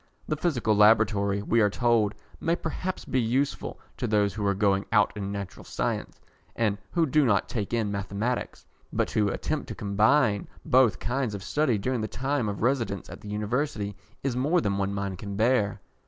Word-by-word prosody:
The 155 - 0
Physical 130 -9 +1
Laboratory, 105 -2 +4
we 115 +2 +3
are 105 - +4
told, 110 -2 +2 0.2
may 165 - +1
perhaps 180 +2 -4
be 130 - +1
useful 130 +5 -1 0.2
to - - -2
those 105 -2 +2
who 105 - -4
are 100 - +2
going 100 -1 +2
out 105 -2 +3
in 100 -1 -4
Natural 100 -2 -6
Science, - - -3 0.4
and 105 -3 0
who 170 -2 +3
do 150 +1 +3
not 105 -7 +2
take 105 -5 -3
in 115 -3 0
Mathematics, 100 +5 -3 0.3
but - - 0
to 105 -2 +1
attempt 155 +8 -2
to - - -6
combine 105 +1 +2 0.2
both 125 -7 +4
kinds 125 -4 -2
of 100 - -7
study 145 -1 +1
during 125 +3 -1
the 110 - -2
time 130 -1 -1
of 100 +1 -4
residence 120 -6 0
at - - -10
the 105 - -9
University 105 0 -2 0.3
is 135 -3 -1
more 145 +8 +2
than 100 -2 -1
one 100 0 0
mind 100 -2 -3
can 100 -1 -5
bear. 110 -1 +2
110 Hz, 185 wpm, -27 LUFS, 100-130 Hz, 0.4 s, Laboratory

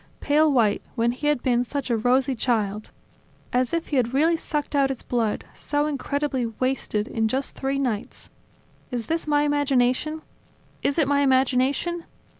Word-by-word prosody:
Pale 305 +1 +3
white, 225 -6 +2
when 235 -1 +2
he 275 +4 -3
had 295 -4 +1
been 245 -1 +2
such 265 0 -4
a - - +3
rosy 255 +4 +2
child! 215 -4 -1 0.6
As 250 0 +1
if 335 0 -2
he 290 - 0
had 245 0 +1
really 320 +4 +4
sucked 300 -2 -3
out 275 -1 +3
his 265 -3 -5
blood; 230 -4 -1
so 290 0 -1
incredibly 280 -3 -1
wasted, 225 -2 -1
in 225 -1 0
just 265 +4 -2
three 270 0 -2
nights! 245 -7 -3 0.6
Is 240 -2 -3
this 325 -1 -2
my 295 -1 +3
imagination? 290 +1 +1 0.6
Is 280 - 0
it 310 -5 +3
my 285 0 +2
imagination? 270 +5 +1
265 Hz, 165 wpm, -24 LUFS, 245-290 Hz, 0.6 s, really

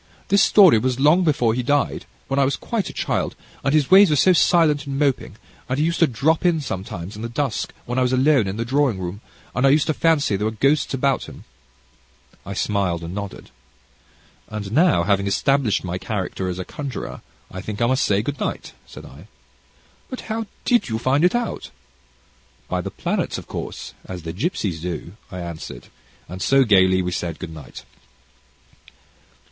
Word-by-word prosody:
This 200 +1 +4
story 185 - +6
was 130 +2 -1
long 155 +6 +5
before 145 -8 +2
he 125 - -1
died 145 +3 0 0.2
when 135 0 0
I - - +5
was 135 +1 +1
quite 225 -4 -3
a - - -6
child - - -2 0.3
and 135 - +1
his 150 -1 +2
ways 195 0 +8
were 150 - +3
so 185 +6 +5
silent 155 -4 +3
and 135 -1 -3
moping, 140 -7 0 0.3
and 130 - 0
he 150 - +2
used 170 0 -1
to 165 - +5
drop 150 - +1
in 175 -3 +3
sometimes, 95 - -6
in 105 - -8
the 115 - -4
dusk, 135 0 -2
when 120 +2 -2
I - - +2
was 125 -1 +2
alone 130 -3 +3
in 95 +2 -4
the 115 - -2
drawing 135 -3 +1
room, 95 +3 -6 0.3
and 125 - -1
I 135 - +6
used 145 +2 +4
to 155 - 0
fancy 155 -9 +2
there 105 +2 -2
were 110 0 -5
ghosts 140 +3 +2
about 135 0 0
him." - - -12 1.0
I - - -5
smiled 95 -5 -1
and 85 +1 -6
nodded. 100 -1 -7 1.0
"And 105 -2 -6
now, 155 - +4
having 100 +1 +1
established 135 +2 +1
my 90 0 -4
character 95 -3 -3
as 90 - -4
a 95 - -5
conjurer, 140 -3 -6 0.3
I 95 - -6
think 105 +1 -6
I 120 - +3
must 130 +3 +2
say 100 +1 +1
good 145 +3 -4
night," - - -4
said - - -11
I. - - -14 0.8
"But 255 - -6
how 225 0 -4 0.2
did 240 - +2
you 110 - -1
find 130 +6 +1
it 180 +5 +4
out?" 240 -1 -3 1.0
"By - - -1
the - - -5
planets, - - -2
of - - -8
course, - - -7
as 90 -3 -7
the 80 0 -5
gipsies 100 - -2
do," 85 -1 -5 0.2
I 90 -1 -6
answered, 80 -8 -8 0.4
and 90 +2 -8
so, 135 +6 +4
gaily 95 -4 +4
we 90 - -2
said 85 -2 -3
good 85 -3 -7
night. 75 -5 -11
125 Hz, 195 wpm, -22 LUFS, 95-150 Hz, 1.0 s, ways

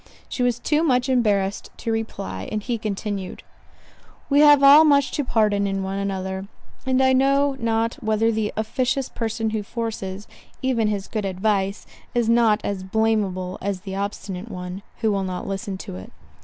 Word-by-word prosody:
She - - -4
was 245 -1 +2
too 300 +5 +1
much 260 -5 +2
embarrassed 205 -6 +1
to 230 - -3
reply, 95 - -4
and 210 -1 -2
he 235 -1 -2
continued, 205 -2 -4 0.9
"We 285 - +5
have 295 -2 +7
all 285 +3 +9
much 280 -3 +4
to 290 - -1
pardon 210 -5 +2
in 195 0 -2
one 195 +1 -3
another: 190 -1 -3 0.4
and 260 0 +3
I 260 0 +4
know 275 +1 +3
not 230 +3 -1
whether 220 0 +2
the 220 -1 -1
officious 255 +4 -1
person 225 -1 -2
who 215 -1 -1
forces, 205 -3 -5 0.4
even 240 -4 +1
his 205 -2 -2
good 215 -2 -3
advice, 195 +1 -1 0.3
is 240 -2 +2
not 230 -2 +4
as 200 -2 -2
blameable 190 -3 0
as 195 -1 -3
the 190 0 -7
obstinate 200 0 -4
one, 180 -1 -6 0.2
who 220 -2 +2
will 195 -1 0
not 185 -1 -4
listen 195 0 -4
to 90 - -8
it. 95 - -10
215 Hz, 170 wpm, -23 LUFS, 195-240 Hz, 0.9 s, all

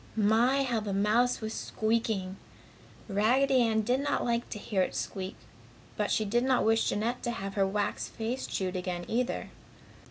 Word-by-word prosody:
My! 230 +6 +3
how 240 -4 0
the 205 -2 -3
mouse 225 +6 +2
was 220 0 -4
squeaking! 215 -4 -1 0.7
Raggedy 250 +6 +3
Ann 220 -2 +2
did 250 +4 +1
not 285 +1 0
like 235 0 0
to - - -5
hear 205 -2 -1
it - - -1
squeak, 190 0 -4 0.6
but - - -1
she 215 - +1
did 240 +4 +1
not 260 -1 +2
wish 225 0 +3
Jeanette 230 +4 -1
to - - -2
have 195 -4 -4
her 195 -1 +2
wax 205 +1 -1
face 235 +4 -4
chewed 185 -1 -2
again, 180 -1 -3
either. 245 +2 -1
220 Hz, 170 wpm, -30 LUFS, 200-240 Hz, 0.7 s, My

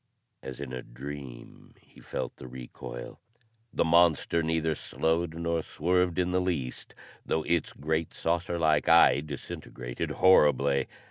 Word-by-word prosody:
As 65 -1 -8
in 70 -3 -6
a 65 - -4
dream, 65 0 -10
he - - -20
felt - - -5
the 65 - -10
recoil. - - -9 0.5
The - - +1
monster 85 0 +4
neither 80 0 0
slowed 80 +2 -1
nor 85 0 -1
swerved 90 +2 0
in 90 -1 +1
the 90 0 +2
least, 80 -9 -3 0.3
though 80 - -1
its 85 -1 0
great, 80 +2 -2
saucer 85 +1 -1
like 80 -3 +2
eye 85 -3 +7
disintegrated 65 -4 -6
horribly. 70 -6 +4
80 Hz, 135 wpm, -28 LUFS, 70-85 Hz, 0.5 s, eye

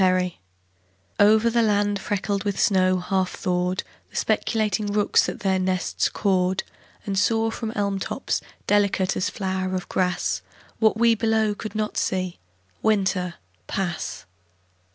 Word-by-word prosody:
THAW 185 -1 +3 0.9
OVER 215 +3 +5
the 235 0 +3
land 205 -2 +2
freckled 200 0 -2
with 205 -2 -2
snow 185 -2 +3
half 185 0 -1
thawed 180 0 -1 0.3
The - - -20
speculating 215 -2 0
rooks 205 0 +2
at - - -7
their 190 -1 +2
nests 185 -1 0
cawed 185 -2 +1 0.4
And 195 -2 0
saw 225 +2 +2
from 225 0 -4
elm 200 -1 0
tops, - - -2 0.2
delicate 200 -2 +2
as 185 - 0
flower 190 -1 -2
of 185 - -4
grass, 180 -1 0 0.4
What 220 -1 +3
we 230 0 +5
below 220 -1 +1
could 215 +1 -7
not 215 0 -2
see, 185 -2 -1 0.4
Winter 190 -4 +1 0.3
pass. 175 -4 -3
195 Hz, 135 wpm, -24 LUFS, 185-215 Hz, 0.9 s, OVER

